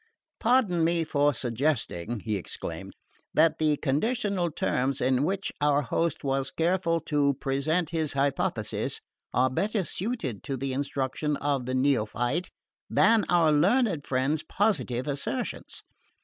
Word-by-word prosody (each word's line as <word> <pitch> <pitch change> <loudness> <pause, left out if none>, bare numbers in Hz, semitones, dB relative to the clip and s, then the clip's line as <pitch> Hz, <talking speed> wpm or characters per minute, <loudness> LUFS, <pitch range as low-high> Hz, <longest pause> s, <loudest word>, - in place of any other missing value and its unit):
"Pardon 225 -9 +3
me 165 0 +2
for 145 -2 +2
suggesting," 120 - -1
he 110 0 -2
exclaimed, 95 - -6 0.4
"that 160 0 +4
the 155 -2 +2
conditional 190 - 0
terms 135 -3 0
in 130 0 +2
which 195 +4 -1
our 145 0 +3
host 165 +5 -1
was 135 -1 0
careful 170 0 +1
to 145 -3 +1
present 150 +6 0
his 160 -3 -1
hypotheses 140 0 -1 0.3
are 130 +1 +2
better 205 - 0
suited 180 - -3
to 135 - -3
the 135 +1 -2
instruction 140 +2 -1
of 140 -3 -1
the 130 - -1
neophyte 130 +4 +1 0.4
than 220 0 +4
our 170 -3 +4
learned 180 - +3
friend's 135 +4 0
positive 140 - 0
assertions. 145 - -3
145 Hz, 130 wpm, -27 LUFS, 135-170 Hz, 0.4 s, that